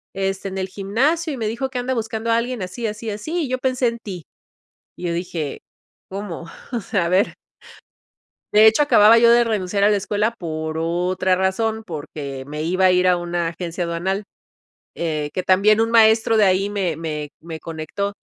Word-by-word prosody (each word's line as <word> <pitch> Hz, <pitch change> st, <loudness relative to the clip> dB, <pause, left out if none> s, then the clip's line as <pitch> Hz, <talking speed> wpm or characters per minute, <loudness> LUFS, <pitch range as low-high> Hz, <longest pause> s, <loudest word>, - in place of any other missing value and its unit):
este 195 Hz, 0 st, -2 dB
en 190 Hz, -, -6 dB
el 190 Hz, -, -2 dB
gimnasio 260 Hz, -, 0 dB
y 265 Hz, -, -5 dB
me 220 Hz, -, -2 dB
dijo 235 Hz, +5 st, -2 dB
que 260 Hz, -1 st, -4 dB
anda 250 Hz, +1 st, -1 dB
buscando 225 Hz, 0 st, -2 dB
a 230 Hz, -, +4 dB
alguien 245 Hz, -1 st, -2 dB
así, 185 Hz, +6 st, -5 dB
así, 215 Hz, +2 st, -5 dB
así 310 Hz, +12 st, -3 dB
y -, -, -7 dB
yo 255 Hz, -, 0 dB
pensé 255 Hz, -1 st, +1 dB
en 235 Hz, -, -2 dB
ti", 180 Hz, -7 st, -7 dB, 0.7 s
y -, -, -9 dB
yo 170 Hz, -, -1 dB
dije, 170 Hz, -4 st, -4 dB, 0.5 s
¿cómo?, 190 Hz, -4 st, -6 dB, 0.3 s
o 240 Hz, -, -1 dB
sea, 195 Hz, -5 st, -1 dB
a -, -, 0 dB
ver. 185 Hz, +3 st, +2 dB, 1.2 s
De 215 Hz, +1 st, +8 dB
hecho, 220 Hz, +7 st, +5 dB
acababa 225 Hz, -6 st, +6 dB
yo 235 Hz, 0 st, +6 dB
de 240 Hz, 0 st, +6 dB
renunciar 200 Hz, -3 st, -1 dB
a 205 Hz, -, +6 dB
la 210 Hz, -, +3 dB
escuela 205 Hz, +2 st, 0 dB
por 160 Hz, -2 st, -4 dB
otra 180 Hz, +3 st, +1 dB
razón, 220 Hz, +4 st, 0 dB
porque 145 Hz, -5 st, -6 dB
me 150 Hz, +1 st, -4 dB
iba 185 Hz, +3 st, +1 dB
a 185 Hz, -, +6 dB
ir 180 Hz, 0 st, +3 dB
a 180 Hz, -1 st, +4 dB
una 175 Hz, -1 st, -2 dB
agencia 170 Hz, +1 st, -4 dB
aduanal, 180 Hz, +4 st, -2 dB, 0.7 s
eh, 155 Hz, -3 st, -2 dB
que 185 Hz, -, -2 dB
también 200 Hz, +4 st, +4 dB
un 225 Hz, 0 st, 0 dB
maestro 225 Hz, 0 st, +5 dB
de 215 Hz, -, +5 dB
ahí 190 Hz, +1 st, +2 dB
me 190 Hz, -6 st, -1 dB
me 150 Hz, -2 st, -4 dB
me 160 Hz, -1 st, -7 dB
conectó. 165 Hz, +5 st, -4 dB
195 Hz, 195 wpm, -21 LUFS, 170-225 Hz, 1.2 s, De